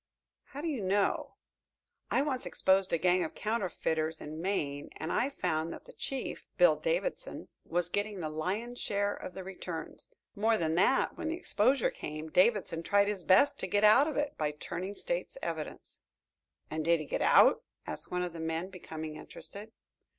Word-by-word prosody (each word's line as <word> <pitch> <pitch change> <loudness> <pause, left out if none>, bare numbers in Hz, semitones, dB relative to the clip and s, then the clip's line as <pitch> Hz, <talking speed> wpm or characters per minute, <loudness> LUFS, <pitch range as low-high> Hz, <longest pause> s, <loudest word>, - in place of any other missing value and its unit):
"How 285 - -8
do 335 - -2
you 280 -8 -1
know? 195 +1 +1 0.7
I 270 - +3
once 270 -4 -2
exposed 190 0 +3
a 170 - +3
gang 180 +1 +3
of 160 - -5
counterfeiters 165 -7 -1
in 155 +2 -7
Maine 145 -7 -2
and 160 +2 -4
I 265 - +2
found 165 - -1
that - - -9
the - - -13
chief, 270 -1 -4
Bill - - +6
Davidson, - - -2 0.2
was 175 0 0
getting 205 +2 -2
the 160 - -2
lion 185 +10 -2
share 205 -4 0
of 180 - -8
the 190 - -6
returns. 180 -3 -7 0.2
More 220 +2 +2
than 160 -4 0
that, 190 +10 +2
when 325 - -2
the 325 +1 -1
exposure 255 - +2
came, 155 +1 -6
Davidson 185 -3 +3
tried 200 +3 +3
his 200 -4 -3
best 190 - +5
to - - -1
get 205 +1 +1
out 230 +8 +7
of 310 - -3
it 290 0 -1
by 150 -1 0
turning 185 +6 -5
State's - - -3
evidence." - - -5 0.7
"And 155 0 -2
did 170 +1 +4
he 155 - -5
get - - -2
out?" - - +6 0.2
asked - - -5
one 180 0 -1
of 175 -2 -4
the 165 - -7
men, 160 +3 -2
becoming 160 -4 -7
interested. 205 +7 -9
190 Hz, 180 wpm, -31 LUFS, 160-225 Hz, 0.7 s, out